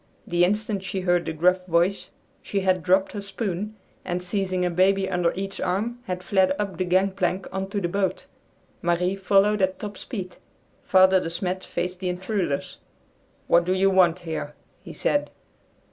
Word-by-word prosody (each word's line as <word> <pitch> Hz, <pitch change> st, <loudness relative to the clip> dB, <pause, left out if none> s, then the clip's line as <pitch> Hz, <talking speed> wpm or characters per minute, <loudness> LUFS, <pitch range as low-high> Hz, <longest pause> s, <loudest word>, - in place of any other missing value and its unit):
The 175 Hz, -4 st, +2 dB
instant 210 Hz, +1 st, 0 dB
she 190 Hz, 0 st, -4 dB
heard 175 Hz, -1 st, +1 dB
the -, -, 0 dB
gruff 180 Hz, +3 st, +2 dB
voice 175 Hz, +3 st, +1 dB, 0.3 s
she 200 Hz, -, -2 dB
had 185 Hz, -1 st, +2 dB
dropped 190 Hz, +3 st, +2 dB
her 205 Hz, -, -5 dB
spoon, 200 Hz, 0 st, -4 dB, 0.3 s
and, 180 Hz, 0 st, -3 dB
seizing 185 Hz, -1 st, -1 dB
a 180 Hz, -, 0 dB
baby 190 Hz, +2 st, +3 dB
under 180 Hz, -2 st, +1 dB
each 195 Hz, +1 st, -5 dB
arm, 220 Hz, +7 st, -1 dB
had 180 Hz, 0 st, -4 dB
fled 190 Hz, 0 st, +2 dB
up 200 Hz, -4 st, -3 dB
the 185 Hz, -, 0 dB
gangplank 185 Hz, 0 st, +1 dB
on 190 Hz, 0 st, -3 dB
to 205 Hz, -, -2 dB
the 175 Hz, -, -1 dB
boat. 190 Hz, +1 st, -1 dB, 0.6 s
Marie 175 Hz, +2 st, +1 dB
followed 195 Hz, +2 st, +3 dB
at 190 Hz, 0 st, +1 dB
top 205 Hz, -2 st, -7 dB
speed. 185 Hz, -7 st, -6 dB, 0.4 s
Father 190 Hz, 0 st, +5 dB
De 165 Hz, -, -4 dB
Smet 180 Hz, +2 st, -3 dB
faced 180 Hz, +1 st, -4 dB
the 185 Hz, -1 st, -2 dB
intruders. 180 Hz, -4 st, -2 dB, 0.7 s
"What 170 Hz, -, +4 dB
do 180 Hz, +2 st, 0 dB
you 195 Hz, +1 st, +3 dB
want 180 Hz, -3 st, +4 dB
here?" 160 Hz, -4 st, -5 dB, 0.3 s
he -, -, -10 dB
said. -, -, 0 dB
185 Hz, 175 wpm, -25 LUFS, 180-195 Hz, 0.7 s, Father